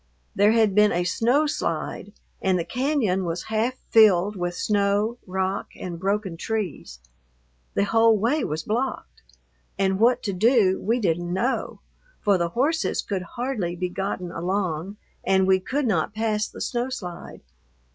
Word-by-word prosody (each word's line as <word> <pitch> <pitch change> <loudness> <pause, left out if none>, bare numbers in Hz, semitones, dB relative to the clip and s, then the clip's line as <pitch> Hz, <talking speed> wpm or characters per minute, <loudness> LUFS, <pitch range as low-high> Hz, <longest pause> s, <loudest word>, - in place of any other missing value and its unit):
There 205 +2 +4
had 220 -3 +3
been 210 +1 +5
a 175 +1 0
snow 240 - +2
slide 180 - -3 0.3
and 190 -1 +2
the 170 - -2
cañon 250 -8 0
was 170 0 -3
half 230 +4 +1 0.2
filled 210 -2 +5
with 175 -1 -3
snow, 205 +4 +1
rock, 190 +1 -2
and 175 -2 -6
broken 195 -2 -1
trees. 190 - -4 0.8
The - - +3
whole 225 +1 +4
way 245 +8 +1
was 155 +2 -3
blocked, 220 - -3 0.6
and 190 0 +1
what 240 +3 +3
to 200 - -2
do 205 -1 +3
we 230 +5 +1
didn't 175 -4 -1
know, 235 +9 -1 0.4
for 200 -3 +2
the 170 0 0
horses 295 - 0
could 195 -3 -3 0.2
hardly 235 -9 -2
be 180 +1 -2
gotten 180 -1 -4
along 185 +1 -2 0.3
and 190 0 +3
we 190 0 +4
could 275 +9 -2
not 200 -2 0
pass 215 -1 0
the - - -11
snow 245 +1 -1
slide. 180 -9 -7
200 Hz, 155 wpm, -24 LUFS, 180-225 Hz, 0.8 s, been